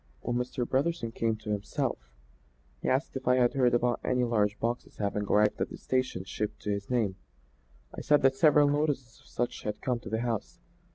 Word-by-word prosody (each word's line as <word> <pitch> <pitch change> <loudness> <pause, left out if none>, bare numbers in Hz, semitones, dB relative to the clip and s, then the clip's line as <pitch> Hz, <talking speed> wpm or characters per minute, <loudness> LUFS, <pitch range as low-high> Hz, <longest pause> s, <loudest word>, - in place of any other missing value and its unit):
"When 120 - -2
Mr. 125 0 -2
Brotherson 135 -3 0
came 115 -1 0
to 110 0 -6
himself 100 -11 -2 0.7
he - - -1
asked 135 +3 0
if 130 -1 -5
I 125 - +5
had 125 -1 +3
heard 125 -3 +3
about 120 0 +1
any 125 0 +1
large 105 -3 +1
boxes 120 +1 -3
having 105 0 -1
arrived 105 +1 +2
at - - 0
the - - -8
station 130 -8 -1
shipped 105 +2 -4
to 105 - -1
his 100 0 -3
name. 110 -7 0 0.8
I - - -5
said 150 -2 +3
that 135 0 +5
several 150 -1 +5
notices 145 -4 -1
of - - -22
such 120 0 -3
had 105 - -4
come 125 -2 -1
to 115 - -9
the 110 +1 -1
house. 115 -4 -3
120 Hz, 205 wpm, -29 LUFS, 105-130 Hz, 0.8 s, I